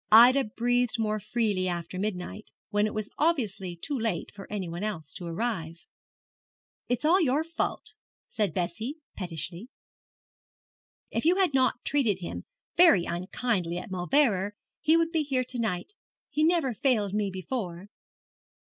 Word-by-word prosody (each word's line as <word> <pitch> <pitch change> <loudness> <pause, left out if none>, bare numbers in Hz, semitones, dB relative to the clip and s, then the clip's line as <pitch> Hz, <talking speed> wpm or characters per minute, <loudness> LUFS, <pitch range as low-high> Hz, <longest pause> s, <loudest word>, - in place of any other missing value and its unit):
Ida 250 +5 +8
breathed 245 +2 +1
more 215 -1 0
freely 210 -3 0
after 175 +1 -3
midnight, 205 +1 -4 0.2
when 205 0 +3
it - - -5
was 215 -1 -3
obviously 220 - 0
too 280 - -3
late 225 -8 -2
for 200 -1 -11
any 200 -4 -2
one 170 +3 -5
else 165 -9 -4
to 175 - -6
arrive. 170 -3 -3 1.0
'It 245 +4 0
is 360 +5 +5
your 295 0 +2
fault,' 330 +1 -3 0.3
said 210 -5 0
Bessie, 185 - -2 0.2
pettishly. 175 - -5 1.4
'If - - -1
you 340 +3 +5
had 375 -6 +2
not 255 -2 +2
treated 250 -9 +2
him 175 - -6 0.3
very 330 - +6
unkindly 180 0 -1
at 180 +2 -6
Mauleverer 200 +1 +2 0.2
he 320 +2 +4
would 330 0 +1
be 325 -2 +2
here 270 -3 0
to 250 0 -6
night. 220 - -2 0.4
He 305 - +1
never 320 -6 +3
failed 215 -5 +1
me 210 -1 +1
before.' 190 -1 -4
215 Hz, 145 wpm, -28 LUFS, 185-260 Hz, 1.4 s, Ida